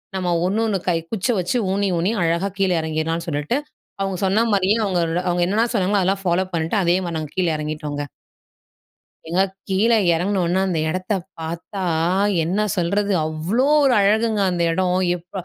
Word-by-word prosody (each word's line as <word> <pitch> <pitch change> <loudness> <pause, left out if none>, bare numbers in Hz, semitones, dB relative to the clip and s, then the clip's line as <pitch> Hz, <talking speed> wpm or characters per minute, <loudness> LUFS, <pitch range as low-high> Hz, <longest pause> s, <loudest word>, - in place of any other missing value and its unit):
நம்ம 185 -2 -1 0.2
ஒண்ணு 195 +4 0
ஒண்ணு 205 -3 0
கை 170 - +2
குச்சிய 225 +2 0
வச்சு 180 +7 0
ஊணி, 200 +1 +1
ஊணி 180 +5 +1
அழகா 170 +4 0
கீழே 190 -2 +2
எறங்கிடலாம்ன்னு 160 +1 -2
சொல்லிட்டு, 150 - -1 0.4
அவங்க 195 -1 -1
சொன்ன 205 +5 +2
மாரியே 200 +2 +2
அவங்க, 185 -3 0 0.3
அவங்க 175 0 +1
என்னென்ன 220 +5 +1
சொன்னாங்களோ 200 0 +2
அதெல்லாம் 195 +1 0
ஃபாலோ 180 +1 +2
பண்ணிட்டு 165 +4 -1
அதேமாரி 175 -1 0
நாங்க 155 -2 -5
கீழே 180 -3 +2
எறங்கிட்டோங்க. 150 -1 -4 1.2
ஏங்க, 175 +3 +2 0.3
கீழே 220 +5 +3 0.2
இறங்குனோன 180 +1 0
அந்த 175 -4 -1
இடத்தை 185 +4 -1 0.2
பாத்தா 170 +4 -5 0.6
என்ன 180 +6 -1 0.2
சொல்றது, 200 +3 0
அவ்வளோ 165 +11 0 0.2
ஒரு 270 -2 +4
அழகுங்க. 215 +1 +2
அந்த 175 -1 0
இடம் 180 +1 +1 0.2
எப்பா 180 +2 -8
185 Hz, 155 wpm, -21 LUFS, 170-200 Hz, 1.2 s, ஒரு